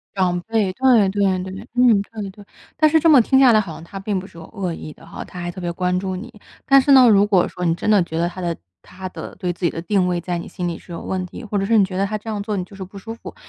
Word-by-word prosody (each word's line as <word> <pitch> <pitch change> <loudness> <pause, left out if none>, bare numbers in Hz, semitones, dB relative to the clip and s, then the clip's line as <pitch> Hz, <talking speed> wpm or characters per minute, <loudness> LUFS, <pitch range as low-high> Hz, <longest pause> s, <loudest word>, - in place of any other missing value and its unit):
长 180 -2 +1
辈， 220 -4 +1
对 240 -4 +4
对 200 +1 0 0.2
对 190 0 -7
对， 205 +5 -9
嗯， 245 -4 +4
对 210 -1 -7
对。 200 +1 -14 0.3
但 310 0 +5
是 320 - +4
这 330 - +4
么 290 -4 +8
听 265 +4 +2
下 265 -2 +7
来 215 - +5
好 195 -6 -4
像 160 - -10
他 195 +3 -8
并 195 0 -2
不 185 - -5
是 185 -3 -15
有 165 - -10
恶 190 -4 -4
意 155 -2 -8
的 - - -18
哈， - - -8
他 180 - -9
还 175 0 -4
特 180 - -10
别 175 -1 -3
关 180 +1 0
注 190 0 -3
你。 230 +6 -8 0.3
但 275 0 +6
是 280 +2 +4
呢， 260 -2 +8
如 205 -1 +5
果 190 -4 +3
说 180 - -5
你 165 -1 +2
真 195 - -3
的 205 -3 +5
觉 160 -1 -6
得 170 +1 +1
他 180 - -10
的 170 -2 -2 0.3
他 185 0 -9
的 - - -9
对 180 - -2
自 175 +1 -4
己 - - +3
的 165 - -6
定 185 +1 +1
位 175 -1 -1
在 175 0 -3
你 170 - -7
心 180 -2 -4
里 165 - -5
是 175 - -12
有 170 - -6
问 185 -1 -3
题， 180 - -10
或 210 -2 -3
者 195 - 0
是 225 +2 +3
你 205 - +6
觉 185 -1 -4
得 195 - +1
他 215 +2 -3
这 215 +2 -9
样 210 -2 -3
做 210 +1 -3
你 185 - -2
就 195 +2 -14
是 195 - -6
不 195 +2 -13
舒 225 +3 -7
服， 230 - -11
195 Hz, 350 characters per minute, -21 LUFS, 180-215 Hz, 0.3 s, 么